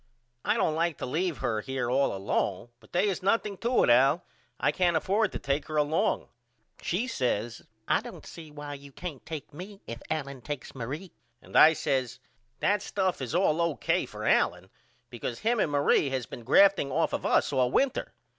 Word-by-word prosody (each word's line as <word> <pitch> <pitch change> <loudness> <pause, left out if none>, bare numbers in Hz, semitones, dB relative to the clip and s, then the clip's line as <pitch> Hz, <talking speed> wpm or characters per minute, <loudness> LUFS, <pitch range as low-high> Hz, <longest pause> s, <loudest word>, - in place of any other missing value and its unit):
I - - +2
don't 155 - +1
like 165 -1 0
to - - -4
leave 160 +4 -1
her 110 -3 0
here 130 0 -3
all 135 +2 +2
alone 95 +2 -1
but - - -21
they 180 +4 +2
is 195 - -1
nothing 200 +1 +1
to 240 +2 +2
it - - +4
Al 135 +7 +4 0.4
I - - +2
can't 175 -3 +2
afford 205 +6 +1
to - - -4
take 140 +2 -2
her 155 - -3
along. 150 +2 +1 0.5
She 190 +8 -1
says 120 - -2 0.3
I - - +3
don't - - -10
see 160 -2 -10
why 145 -1 -7
you 140 0 -11
can't 155 -2 -7
take 155 -2 -7
me 195 +6 -9
if 115 0 -7
Allen 140 -4 -3
takes 145 +1 -6
Marie. 145 +8 -6 0.3
And - - -14
I 160 +1 +8
says 130 -4 -1 0.4
That 205 0 +2
stuff 190 -7 -1
is 130 +4 -3
all 170 -3 +3
O.K. 170 -3 0
for - - -7
Allen - - +2 0.4
because 120 0 -4
him 235 +1 +1
and 155 - +1
Marie 145 0 +3
has 130 -2 -2
been 120 - -9
grafting 195 - +5
off 160 +4 +1
of - - -2
us - - +2
all 130 -2 +3
winter. 265 - 0
150 Hz, 195 wpm, -28 LUFS, 130-180 Hz, 0.5 s, I